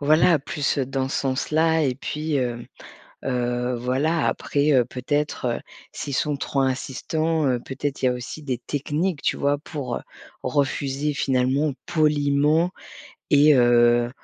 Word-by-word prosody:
voilà, 155 +3 +4
plus 145 +1 -1
dans 135 0 -1
ce - - -2
sens-là. 155 +4 +1
Et 130 -2 0
puis, 150 +3 -3
hem, 120 -3 -1 0.6
heu, 125 0 -1
voilà, 140 +7 +1
après, 145 +1 +1
heu, 125 -3 +4
peut-être, 145 +3 -2
heu, - - -6 0.3
s'ils 140 - -5
sont 145 +2 0
trop 140 - -2
insistants, 150 +4 -1
heu, 125 -2 +1
peut-être, 135 +2 -5
il - - +4
y - - +5
a - - 0
aussi 125 +5 -7
des 130 -4 -2
techniques, 150 +5 -2
tu - - +1
vois, 145 +1 +1
pour, 140 -5 -5
heu, - - -5 0.4
refuser 140 +2 -1
finalement, 135 +2 +1
poliment 150 0 +2 0.6
et 145 +1 +6
heu 120 -1 +4
140 Hz, 145 wpm, -23 LUFS, 130-150 Hz, 0.6 s, et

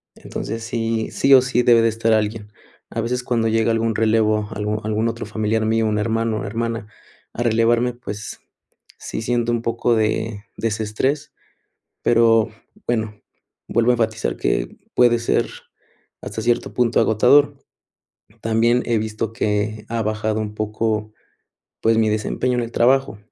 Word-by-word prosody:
entonces, 115 +1 -6
sí 115 -1 -2
sí 135 - +3
o 130 - +9
sí 125 -1 +1
debe 115 -1 +6
de 115 - +3
estar 115 0 +1
alguien. 105 -1 -1 0.4
A 115 - -2
veces, 125 +2 -2
cuando 115 -2 0
llega 115 +1 +2
algún 115 0 0
relevo, 110 -1 +2
algún 105 0 -2
algún 110 +1 0
otro 115 -1 -4
familiar 110 +1 -1
mío, 110 0 +1
un 105 0 0
hermano 115 0 0
o - - -5
hermana 115 0 -3 0.5
a 120 - -4
relevarme, 120 +1 +2
pues, 110 -3 -8 0.6
sí - - -5
siento 120 0 0
un 115 -1 -1
poco 115 0 +1
de 110 -1 -1
desestrés, 115 +7 -2 0.7
pero 115 -1 +4 0.4
bueno, 110 -3 -2 0.5
vuelvo 120 +1 +3
a - - +3
enfatizar 110 - -1
que - - -1 0.2
puede 120 -1 +5
ser 115 - 0 0.7
hasta 110 - -5
cierto 120 +1 0
punto 120 -2 +2
agotador. 140 +6 +4 0.9
También 115 +2 +2
he 120 -1 +1
visto 110 +1 -3
que 105 -1 -1
ha 115 -1 -1
bajado 110 0 -1
un 105 -1 -4
poco, 110 0 -2 0.7
pues, 115 0 +3
mi 110 -1 +3
desempeño 125 +4 -1
en - - +1
el 115 - -8
trabajo, 130 -2 +2
115 Hz, 150 wpm, -21 LUFS, 110-120 Hz, 0.9 s, o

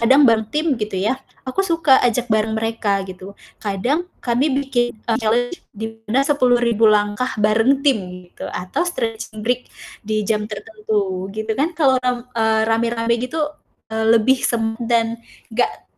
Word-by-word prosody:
kadang 260 +5 +5
bareng 220 -1 +3
tim 305 +2 -1
gitu, 210 -2 -3
ya. 210 +7 +1 0.3
Aku 260 +9 -1
suka 330 -7 +4
ajak 245 0 +1
bareng 220 0 +1
mereka 220 -3 0
gitu, 190 +1 -10 0.2
kadang 245 - -1 0.2
kami 245 +5 +2
bikin 260 -4 0 0.2
challenge 240 +8 0 0.2
di 225 +1 -6
mana 265 +5 +3
10.000 245 -6 +3
langkah 210 +4 +1
bareng 225 +7 +3
tim 265 -7 +4 0.3
gitu, - - -8
atau 180 - -4
stretching 225 -8 -4
break 250 +1 -1 0.3
di 215 0 -2
jam 210 0 -1
tertentu 210 -3 -3
gitu 220 0 -2
kan. 300 +9 -1
Kalo 265 -5 +3
ram 250 -1 -1
eee, 220 -1 +2
rame-rame 230 0 +1
gitu, 305 +5 -1 0.5
eee, 220 0 0
lebih 255 +4 +3
sem 225 -2 +1 0.2
dan 230 -1 +1 0.3
gak 240 - -1
230 Hz, 150 wpm, -20 LUFS, 215-255 Hz, 0.5 s, kadang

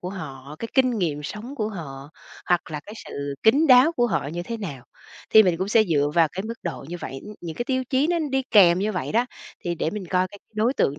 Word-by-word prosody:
của 180 - -5
họ, 145 -5 -8
cái 230 - -5
kinh 255 -4 +3
nghiệm 150 -5 -1
sống 210 - -7
của 215 -3 -1
họ, 145 -8 -8 0.4
hoặc 175 -2 +1
là 150 -1 -4
cái 210 - -9
sự 140 0 -5
kín 280 +9 +5
đáo 260 +5 +7
của 240 -5 +2
họ 185 - -1
như 175 +3 -4
thế 230 +5 -5
nào, 145 - -7 0.5
thì 220 - +9
mình 180 -4 +2
cũng 190 +2 -2
sẽ 220 +1 +5
dựa 145 -5 +1
vào 165 -2 +5
cái 190 +2 -4
mức 230 +2 -5
độ 170 -5 -5
như 175 - -5
vậy, 135 - -6
ưm, 210 - -9
những 165 -2 -7
cái 240 - -2
tiêu 260 0 -1
chí 270 +2 +3
nó 345 0 +1
đi 270 0 +1
kèm 180 -4 +7
như 210 +2 0
vậy 185 - -3
đó, 235 +3 +2 0.4
thì 175 0 -1
để 160 - -1
mình 205 -2 -6
coi 185 0 +2
cái 205 - -13 0.2
đối 225 +5 +1
tượng 145 - +1
190 Hz, 260 wpm, -24 LUFS, 160-230 Hz, 0.5 s, thì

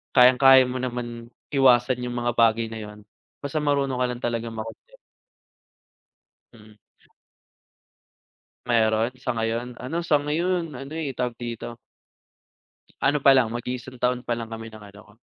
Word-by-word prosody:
kayang-kaya 130 +1 +7
mo 130 - -3
naman 120 -2 -5 0.2
iwasan 125 -2 +4
'yung 120 0 -4
mga 120 0 -1
bagay 115 0 +4
na 110 - -6
'yun, 105 0 -10 0.4
basta 145 +2 -2
marunong 140 -3 0
ka - - +3
lang 125 0 -6
talagang 115 -1 -3
makontento. 115 - -9 1.6
Mm. 105 -1 -17 1.9
Meron, 115 0 +2
sa 125 -3 -3
ngayon, 115 +2 -2
ano 150 +8 -4
sa 165 -3 +2
ngayon 165 +2 -1
ano, 135 +3 -8
eh, 155 -4 -3
tawag 125 -1 -3
dito, 120 0 -6 1.3
ano 145 +2 +3
pa 135 -1 +6
lang 125 -4 +3
mag-iisang 125 +2 -6
taon 125 0 0
pa 120 -1 -2
lang 115 - -5
kami 115 0 -7
ng 110 - -12
ano 100 - -15
ko, 105 - -21
125 Hz, 145 wpm, -24 LUFS, 115-135 Hz, 1.9 s, kayang-kaya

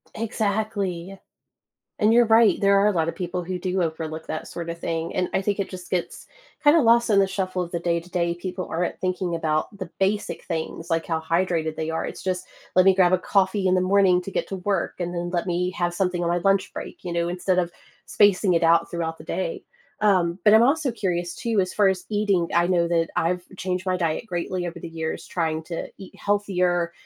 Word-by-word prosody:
Exactly. 200 -4 -2 0.8
And 215 -1 +4
you're 240 0 +6
right, 225 0 +5
there 200 0 +4
are 200 - +4
a - - +4
lot 165 -3 +1
of - - -5
people 180 -1 -3
who 180 +1 -4
do 185 0 0
overlook 160 -1 -4
that 155 - -5
sorta 170 -1 -5
thing, 165 -1 -3
and 180 -1 0
I 190 - +2
think 205 +1 -1
it 200 - -2
just 180 -2 -9
gets 180 -2 -3 0.4
kinda 305 +2 +6
lost 235 -1 +4
in 200 - +5
the 195 - +4
shuffle 185 -1 -2
of 175 -1 -5
the 170 - -2
day 170 0 0
to 170 +2 -15
day, 170 -1 0
people 180 +1 -5
aren't 175 +2 -2
thinking 185 -1 -1
about 155 +3 -1
the 185 -3 -6
basic 205 +2 -1
things 165 0 -4
like 165 -1 0
how 160 -1 -1
hydrated 165 -1 0
they 160 0 -3
are. 160 - -2
It's - - -7
just, 185 -1 -2 0.3
"Let 185 0 +6
me 190 -1 +6
grab 185 -1 +4
a - - +5
coffee 190 +1 +1
in 185 - +3
the 185 - +2
morning 185 -1 +4
to 195 - -7
get - - -2
to 195 - -4
work, 190 0 -1
and 175 0 -3
then 175 0 -3
let 175 -1 -1
me 180 0 0
have 175 -2 -1
something 180 -1 0
on 170 - 0
my 175 +1 +1
lunch 195 +2 +1
break," - - -8
you 175 - -4
know, 170 0 0
instead 180 +1 0
of 175 -1 -1 0.4
spacing 200 -2 +4
it 170 - +2
out 165 +1 +4
throughout 165 -1 -3
the - - -10
day. 485 -6 -3 0.4
Um, 185 -4 +2
but 210 0 +7
I'm 220 - +7
also 280 +1 +2
curious 175 -6 -2
too, 230 -3 -1
as 185 -1 -1
far 205 -2 +4
as 190 -1 -1
eating, 205 -5 +1
I 170 - +4
know 175 -1 +2
that 165 -1 +1
I've 180 +2 0
changed 185 0 -3
my 185 -1 +1
diet 165 +4 -1
greatly 180 -2 -3
over 170 0 -6
the 170 - -7
years, 160 -1 -4
trying 160 -2 -1
to 165 0 -5
eat 195 - -11
healthier 180 -4 0
180 Hz, 230 wpm, -24 LUFS, 170-195 Hz, 0.8 s, but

